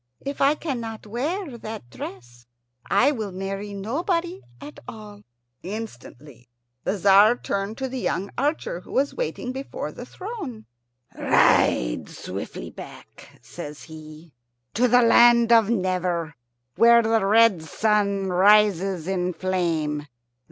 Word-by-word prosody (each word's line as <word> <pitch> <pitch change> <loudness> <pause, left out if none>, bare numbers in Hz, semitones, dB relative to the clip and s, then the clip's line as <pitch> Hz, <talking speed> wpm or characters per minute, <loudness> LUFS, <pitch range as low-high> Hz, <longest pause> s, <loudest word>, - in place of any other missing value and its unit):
If 280 0 -4
I 280 +2 +4
cannot 235 -9 -5
wear 270 - -4
that 215 - -8
dress 120 -2 -10 0.4
I 275 - +4
will 220 -8 -4
marry 195 +2 -5
nobody 335 - -2 0.2
at 295 +1 -11
all." 210 -2 -10 0.4
Instantly 150 - -9 0.3
the 205 - -1
Tzar 200 +4 +6
turned 200 -2 -4
to 265 - -3
the 260 0 -5
young 200 -4 -2
archer, 285 - -2
who - - -13
was 280 +2 +1
waiting 475 - -4
before 265 +1 -6
the - - -10
throne. 370 - -7 0.5
"Ride - - +2
swiftly - - -7
back," - - -13
says 150 0 -9
he, 155 0 -12 0.4
"to 250 +3 +3
the 245 +1 +5
land 235 0 +6
of 225 -2 +5
Never, 180 -6 -1 0.4
where 235 0 +6
the 225 -1 +2
red 210 -3 +4
sun 200 +3 0
rises 195 -2 +3
in 180 -1 -1
flame. 165 -5 -2
210 Hz, 125 wpm, -24 LUFS, 180-240 Hz, 0.5 s, Tzar